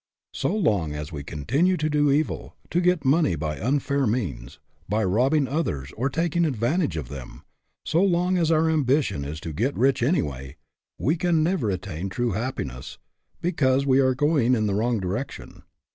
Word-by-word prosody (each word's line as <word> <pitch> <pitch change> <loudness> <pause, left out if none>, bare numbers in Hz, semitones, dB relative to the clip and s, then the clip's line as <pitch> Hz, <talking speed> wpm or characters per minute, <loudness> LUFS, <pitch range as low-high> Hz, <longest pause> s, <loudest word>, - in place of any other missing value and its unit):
So - - -1
long 100 - +1
as 75 +1 -6
we 75 -3 -6
continue 140 - 0
to 155 - 0
do 145 -1 +2
evil, 145 +3 -1 0.2
to 175 - +2
get 180 -4 +2
money 140 - +3
by 75 -1 -3
unfair 140 +3 0
means 80 - -3 0.3
by 110 +2 +1
robbing 130 +9 +2
others 75 - -2
or 130 +5 0
taking 170 +3 0
advantage 130 - 0
of 75 -6 -4
them 65 -1 -9 0.4
so 165 +3 +2
long 180 -1 +2
as 170 -3 +2
our 160 0 +3
ambition 140 - +1
is 75 +3 -5
to 80 -2 -6
get 125 - -1
rich 130 +1 +2
anyway, 70 - -1 0.4
we 150 +6 +1
can 165 -2 +2
never 160 - 0
attain 95 -1 -4
true 120 +4 -1
happiness, 95 - -4 0.4
because 140 -6 +2
we 135 -1 +4
are 130 -1 +3
going 140 -3 +2
in 110 -2 0
the 100 - 0
wrong 115 +2 +1
direction. 100 +8 -5
130 Hz, 175 wpm, -25 LUFS, -, 0.4 s, we